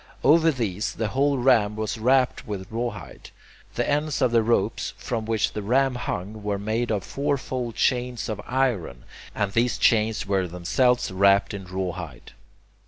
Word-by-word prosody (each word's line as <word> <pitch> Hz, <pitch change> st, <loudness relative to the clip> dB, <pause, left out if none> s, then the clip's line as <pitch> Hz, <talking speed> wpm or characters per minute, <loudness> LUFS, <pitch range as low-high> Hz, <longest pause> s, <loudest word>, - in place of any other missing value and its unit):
Over 165 Hz, +2 st, +5 dB
these 110 Hz, -, -2 dB
the 110 Hz, -2 st, -2 dB
whole 140 Hz, +4 st, +1 dB
ram 120 Hz, -5 st, +3 dB
was 110 Hz, +1 st, -3 dB
wrapped 130 Hz, +2 st, +2 dB
with 100 Hz, -2 st, -6 dB
rawhide. 115 Hz, -4 st, -5 dB, 0.5 s
The -, -, 0 dB
ends 150 Hz, 0 st, 0 dB
of 125 Hz, -, +2 dB
the 115 Hz, -1 st, +4 dB
ropes 115 Hz, +2 st, 0 dB
from 115 Hz, -3 st, -3 dB
which 115 Hz, -1 st, 0 dB
the 105 Hz, -, -3 dB
ram 130 Hz, +5 st, +2 dB
hung 105 Hz, -3 st, -5 dB
were 105 Hz, -1 st, -2 dB
made 110 Hz, +4 st, -2 dB
of 105 Hz, -4 st, -1 dB
fourfold 130 Hz, -4 st, -3 dB
chains 125 Hz, -1 st, 0 dB
of 105 Hz, -2 st, -4 dB
iron, 120 Hz, -, -1 dB, 0.3 s
and 105 Hz, -2 st, -1 dB
these 115 Hz, +3 st, +1 dB
chains 110 Hz, -2 st, +2 dB
were 95 Hz, -2 st, 0 dB
themselves 120 Hz, +8 st, +1 dB
wrapped 100 Hz, +2 st, +3 dB
in 100 Hz, -2 st, -6 dB
rawhide. 90 Hz, -6 st, -5 dB
110 Hz, 160 wpm, -24 LUFS, 100-125 Hz, 0.5 s, Over